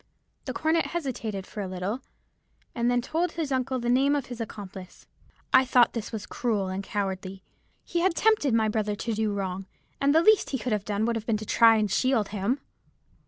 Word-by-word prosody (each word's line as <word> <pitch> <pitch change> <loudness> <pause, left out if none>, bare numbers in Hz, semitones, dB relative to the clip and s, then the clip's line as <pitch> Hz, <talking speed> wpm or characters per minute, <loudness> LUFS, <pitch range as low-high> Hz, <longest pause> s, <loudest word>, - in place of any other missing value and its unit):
The - - -3
cornet 320 +1 +1
hesitated 235 - -4
for 210 - -7
a 195 - -3
little, 185 +6 -3 0.7
and 240 0 0
then 245 0 +1
told 330 +6 -1
his 315 -4 -3
uncle 260 0 0
the 240 -1 -3
name 270 +4 +3
of 285 - -1
his 245 -2 -7
accomplice. 195 -4 -8 0.5
I 260 - +7
thought 250 -2 +4
this 230 -3 -4
was 220 -3 -5
cruel 210 -6 -1
and 190 +1 -3
cowardly. 195 -1 -4 0.4
He 345 - -2
had 345 0 +2
tempted 430 - +3
my 220 -1 +3
brother 210 -1 -1
to 230 +2 -3
do 215 0 0
wrong, 195 -1 -3 0.3
and 280 +2 +3
the 325 - +5
least 435 +1 +5
he 270 - -1
could 245 +1 -4
have 205 -1 -2
done 210 +1 0
would 235 0 0
have 220 - -7
been 225 -2 +2
to 215 - -7
try 225 0 +5
to 210 - +1
shield 225 +1 +1
him. 215 +7 -1
225 Hz, 210 wpm, -27 LUFS, 205-265 Hz, 0.7 s, I